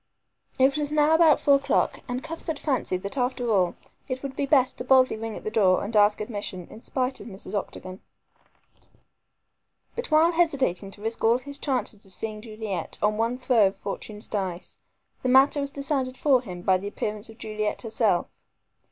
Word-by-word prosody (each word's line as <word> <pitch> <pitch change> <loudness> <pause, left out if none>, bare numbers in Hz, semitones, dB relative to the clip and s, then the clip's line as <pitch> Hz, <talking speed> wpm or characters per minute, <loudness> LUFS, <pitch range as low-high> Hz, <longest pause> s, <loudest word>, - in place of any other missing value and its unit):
It 270 +3 +3
was 295 -1 -2
now 300 +1 +4
about 320 -2 +6
four 280 -1 +5
o'clock, 275 - 0
and 250 +1 -3
Cuthbert 325 -1 -5
fancied 255 -11 -1
that 200 +8 -3
after 245 -1 0
all 185 -4 +2 0.3
it 260 0 -4
would 270 -1 -5
be 280 - -1
best 265 -3 +3
to - - -3
boldly 255 -1 +4
ring 225 0 -5
at - - -10
the 215 - -3
door 195 -5 +3
and 215 +3 -5
ask 210 0 +5
admission, 205 -4 -5
in 220 - -11
spite 260 +1 -2
of - - -10
Mrs. 195 -1 -9
Octagon. 185 -2 -5 1.9
But 480 +1 -4
while 315 +2 +5
hesitating 275 - +1
to 205 +1 -12
risk 225 +1 -3
all 230 +2 +5
his 280 +2 -7
chances 250 -7 -2
of 190 - -8
seeing 215 -1 -3
Juliet 215 -4 -5
on 210 0 +1
one 230 +2 0
throw 245 -5 +4
of 190 - -4
fortune's 210 +1 -5
dice, 190 -4 -4 0.4
the 255 - -1
matter 270 +3 +5
was 280 0 0
decided 275 -2 -2
for 270 -4 +3
him 180 -7 -8
by 185 0 +3
the 200 - -6
appearance 210 +1 -4
of 225 - -13
Juliet 215 0 -3
herself. 220 -5 +1
235 Hz, 185 wpm, -26 LUFS, 210-275 Hz, 1.9 s, about